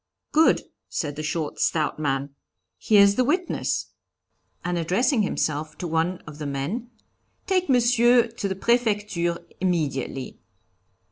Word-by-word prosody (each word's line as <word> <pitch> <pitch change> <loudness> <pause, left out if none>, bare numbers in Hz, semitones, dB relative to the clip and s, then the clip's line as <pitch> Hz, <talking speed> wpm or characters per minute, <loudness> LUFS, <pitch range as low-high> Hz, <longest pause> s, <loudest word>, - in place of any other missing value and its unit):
'Good,' 315 +1 +4 0.3
said 145 -4 -3
the 155 - -4
short, 155 0 -3
stout 155 -1 0
man, 140 -1 -1 0.5
'Here's 200 -1 +5
the 255 - +4
witness!' 350 +7 -1 0.7
and, 175 -1 0
addressing 225 - +2
himself 155 -6 -2
to 175 - -4
one 165 +2 -1
of 150 0 -10
the 150 - -4
men, 155 - -3 0.6
'Take 370 -4 +1
Monsieur 240 -1 +5
to 225 -3 -4
the 190 - -2
Prefecture 205 -6 +1 0.2
immediately.' 145 -7 -2
185 Hz, 125 wpm, -24 LUFS, 155-235 Hz, 0.7 s, Here's